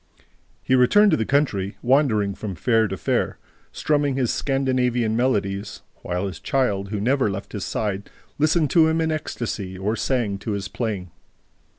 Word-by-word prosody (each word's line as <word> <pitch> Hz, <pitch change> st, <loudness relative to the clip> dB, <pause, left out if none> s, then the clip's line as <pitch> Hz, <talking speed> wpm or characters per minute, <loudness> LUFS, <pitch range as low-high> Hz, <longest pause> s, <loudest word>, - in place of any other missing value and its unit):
He -, -, 0 dB
returned 195 Hz, +12 st, +5 dB
to -, -, +3 dB
the 110 Hz, -, -2 dB
country, 105 Hz, -9 st, 0 dB
wandering 120 Hz, -7 st, +2 dB
from 100 Hz, -1 st, -6 dB
fair 115 Hz, +3 st, +2 dB
to 95 Hz, 0 st, -4 dB
fair, -, -, -1 dB, 0.3 s
strumming 145 Hz, -3 st, 0 dB
his 130 Hz, -3 st, 0 dB
Scandinavian 125 Hz, -4 st, 0 dB
melodies, 100 Hz, -5 st, -1 dB
while 90 Hz, +2 st, -3 dB
his 95 Hz, -4 st, -5 dB
child, 100 Hz, -8 st, 0 dB
who 105 Hz, 0 st, -3 dB
never 130 Hz, +2 st, +2 dB
left 100 Hz, +1 st, -6 dB
his 105 Hz, -3 st, -4 dB
side, 100 Hz, -2 st, -3 dB, 0.3 s
listened 155 Hz, 0 st, +2 dB
to 165 Hz, -2 st, +5 dB
him 160 Hz, +1 st, +1 dB
in 160 Hz, -1 st, +1 dB
ecstasy 110 Hz, -10 st, -4 dB
or 105 Hz, +4 st, -1 dB
sang 110 Hz, -4 st, -1 dB
to 105 Hz, -, -3 dB
his 95 Hz, -2 st, -4 dB
playing. 100 Hz, -7 st, -4 dB
115 Hz, 165 wpm, -23 LUFS, 100-135 Hz, 0.3 s, returned